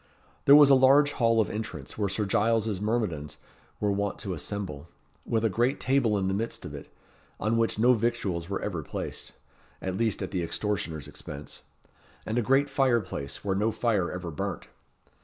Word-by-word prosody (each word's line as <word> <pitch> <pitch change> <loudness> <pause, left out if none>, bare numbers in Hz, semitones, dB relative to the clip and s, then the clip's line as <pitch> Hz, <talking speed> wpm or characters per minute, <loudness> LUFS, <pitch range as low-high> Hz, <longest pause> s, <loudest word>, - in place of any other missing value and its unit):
There 140 - +9
was 145 -1 +8
a - - +9
large 135 +2 +6
hall 115 -4 +2
of 110 - +3
entrance, 110 +1 -6
where 100 -2 -1
Sir 105 +2 -1
Giles's 110 0 +1
myrmidons 105 -10 -2 0.4
were 105 -1 +1
wont 100 +1 -1
to 95 - -3
assemble, 85 -2 -5 0.4
with 115 -1 +1
a - - +6
great 120 +7 +1
table 130 -5 +2
in 95 -1 0
the 95 - 0
midst 110 +4 -3
of - - -7
it, - - -9 0.5
on 110 +3 +1
which 115 -2 +1
no 120 +3 +5
victuals 105 -7 -1
were 100 - -3
ever 90 -6 -2
placed - - -6 0.5
at 95 0 -3
least 110 -3 0
at - - -5
the 90 - -1
extortioner's 85 -5 -3
expense 75 +1 -9 0.6
and 110 +3 0
a - - +2
great 135 +4 +3
fire 135 -4 +3
place, 90 -8 -6
where 95 -1 +1
no 105 +3 +1
fire 110 -5 0
ever 90 -2 -5
burnt. 75 - -4
105 Hz, 185 wpm, -28 LUFS, 95-115 Hz, 0.6 s, There